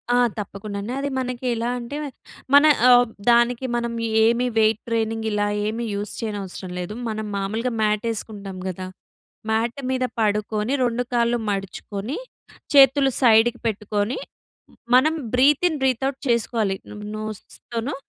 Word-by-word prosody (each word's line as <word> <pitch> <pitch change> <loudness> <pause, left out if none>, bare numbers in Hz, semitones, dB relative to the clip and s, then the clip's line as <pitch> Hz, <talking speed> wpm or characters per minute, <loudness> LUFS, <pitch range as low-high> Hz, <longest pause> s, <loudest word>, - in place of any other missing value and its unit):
ఆ! - - +4 0.2
తప్పకుండానే. 200 +2 -5
అది 280 - -2
మనకి 250 0 -4
ఎలా 230 +1 -1
అంటే‌మే 285 +5 -5 0.4
మన 285 +2 +8 0.2
ఆహ్, 245 0 +7 0.2
దానికి 240 +1 +3
మనం 235 0 -1 0.3
ఏమి 235 +2 +3
వెయిట్ 220 0 +3
ట్రైనింగ్ 225 -1 -1
ఇలా 205 0 +1 0.2
ఏమి 225 +2 -2
యూజ్ 205 0 -4
చేయనవసరం 200 -4 -5
లేదు. 180 +4 -4 0.2
మనం 215 0 -3
మామూలుగా 220 +5 -2
మ్యాట్ 210 -1 +1
వేసుకుంటాం 205 -3 -6
కదా! 185 0 -5 0.6
మ్యాట్ 230 +4 0
మీద 255 -1 0 0.2
పడుకొని 210 +2 0
2 240 0 0
కాళ్ళు 235 0 +2
మడుచుకొని 200 - -4 0.6
చేతులు 270 0 +6
సైడ్‌కి 235 -1 +5
పెట్టుకొని 210 +2 -1 0.8
మనం 295 +6 +5 0.2
బ్రీత్ 280 +6 +4
ఇన్ 315 - -3
బ్రీత్ 265 -1 +1
ఔట్ 275 0 -6
చేసుకోవాలి. 225 -4 +1
నం 210 - -9 0.2
నోస్ 215 -1 -5 0.3
తోను 235 +5 -2
225 Hz, 135 wpm, -23 LUFS, 210-250 Hz, 0.8 s, మన